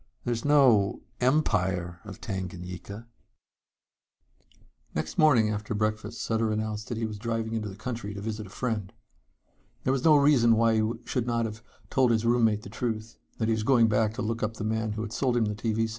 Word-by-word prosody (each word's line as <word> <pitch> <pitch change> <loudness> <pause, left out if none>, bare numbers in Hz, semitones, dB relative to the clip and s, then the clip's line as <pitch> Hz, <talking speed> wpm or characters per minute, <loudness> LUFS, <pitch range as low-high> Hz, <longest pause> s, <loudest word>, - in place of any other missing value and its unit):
There's 120 -1 -1
no 130 -9 +4 0.2
Empire 95 - +1
of 100 -3 -9
Tanganyika." 95 +1 -6 1.9
Next 75 - -3
morning 125 -9 +5
after 105 +1 -3
breakfast 110 +1 -2
Sutter 110 -1 0
announced 110 0 -3
that 120 - -4
he 115 - -1
was 105 -2 -5
driving 115 0 -2
into 110 -2 -2
the 95 - -9
country 110 -2 -5
to - - -5
visit 110 -1 -4
a - - -13
friend. 105 -3 -3 0.9
There 130 - +2
was 135 - -1
no 155 -2 +7
reason 140 -6 +5
why 115 0 +3
he 110 +1 0
should 125 -2 -2
not 115 -1 +1
have 110 0 -6 0.3
told 130 -2 +3
his 115 -1 +1
roommate 115 -3 +3
the - - -8
truth 110 0 -4 0.2
that 110 - 0
he 115 - +2
was 110 - -1
going 115 -1 +4
to 110 0 +1
look 115 +1 -2
up 110 +1 -1
the 110 - -5
man 110 0 -1
who 110 +1 -3
had 115 0 -6
sold 125 -2 +1
him 115 - +3
the 105 - -1
TV 110 +1 -1
set. - - -9
110 Hz, 195 wpm, -28 LUFS, 105-115 Hz, 1.9 s, no